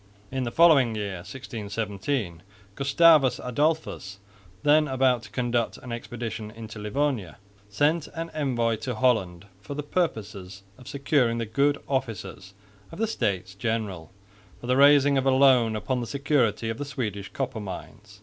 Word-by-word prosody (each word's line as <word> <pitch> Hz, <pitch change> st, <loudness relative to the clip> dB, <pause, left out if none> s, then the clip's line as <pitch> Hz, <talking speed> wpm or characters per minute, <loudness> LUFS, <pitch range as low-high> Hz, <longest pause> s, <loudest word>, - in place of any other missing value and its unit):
In 130 Hz, -1 st, -2 dB
the 120 Hz, -, -3 dB
following 140 Hz, -9 st, +5 dB
year, 100 Hz, -3 st, -3 dB
1617, 105 Hz, -, -4 dB, 0.3 s
Gustavus 140 Hz, +1 st, +4 dB
Adolphus, 145 Hz, -6 st, -1 dB, 0.5 s
then 150 Hz, +1 st, +4 dB
about 130 Hz, -3 st, +2 dB
to -, -, -12 dB
conduct 120 Hz, -2 st, -1 dB
an 125 Hz, -, -10 dB
expedition 115 Hz, -2 st, -5 dB
into 110 Hz, -1 st, -9 dB
Livonia, 105 Hz, -, -2 dB, 0.3 s
sent 145 Hz, +9 st, +1 dB
an 165 Hz, 0 st, -5 dB
envoy 120 Hz, -6 st, 0 dB
to 125 Hz, +2 st, -4 dB
Holland 105 Hz, -7 st, +1 dB, 0.2 s
for 140 Hz, +8 st, -7 dB
the 150 Hz, -, -3 dB
purpose 145 Hz, -, -1 dB
of 100 Hz, +5 st, -12 dB
securing 140 Hz, -4 st, +1 dB
the 115 Hz, -, -2 dB
good 140 Hz, +6 st, +1 dB
offices 100 Hz, -8 st, -4 dB, 0.4 s
of -, -, -9 dB
the 225 Hz, -, +1 dB
States 95 Hz, -, -2 dB
General 100 Hz, -6 st, -3 dB, 0.5 s
for -, -, -10 dB
the 125 Hz, +1 st, +2 dB
raising 140 Hz, 0 st, +6 dB
of 135 Hz, -, -1 dB
a -, -, +5 dB
loan 130 Hz, -4 st, +4 dB
upon 125 Hz, +3 st, -2 dB
the 120 Hz, -, -4 dB
security 130 Hz, -6 st, 0 dB
of 115 Hz, -, -7 dB
the 145 Hz, -, -3 dB
Swedish 105 Hz, -8 st, -4 dB
copper 130 Hz, -4 st, -3 dB
mines. 100 Hz, +2 st, -9 dB
120 Hz, 150 wpm, -26 LUFS, 105-140 Hz, 0.5 s, raising